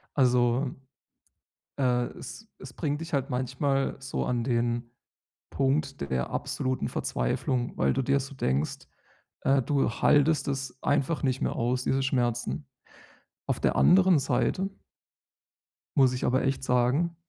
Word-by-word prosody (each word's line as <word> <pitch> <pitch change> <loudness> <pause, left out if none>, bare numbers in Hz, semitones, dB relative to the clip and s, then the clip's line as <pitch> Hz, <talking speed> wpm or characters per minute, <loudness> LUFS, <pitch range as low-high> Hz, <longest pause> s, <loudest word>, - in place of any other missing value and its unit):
Also, 125 0 +2 1.0
äh, 125 -2 +2
es 130 - -9
es - - -10
bringt 150 -2 -2
dich 165 0 -8
halt 135 0 0
manchmal 130 +2 0
so 135 0 -3
an 120 -1 0
den 120 -1 -1 0.6
Punkt 135 +1 0
der 65 -1 -1
absoluten 130 0 -2
Verzweiflung, 120 - -2
weil - - +2
du 135 - 0
dir 140 +2 +2
so 135 +1 -7
denkst, 70 - -1 0.6
äh, 135 0 +3
du 140 +1 +1
haltest 145 +5 +3
es 135 -1 -4
einfach 145 +3 +1
nicht 130 -1 0
mehr - - 0
aus, 125 +2 0
diese 135 0 +1
Schmerzen. 125 +1 -1 0.8
Auf - - -1
der - - +1
anderen 185 -3 +5
Seite 190 +7 0 1.3
muss 130 -2 +5
ich 125 - -3
aber 130 +1 +2
echt 135 0 0
sagen 130 +8 +1
130 Hz, 135 wpm, -28 LUFS, 125-140 Hz, 1.3 s, anderen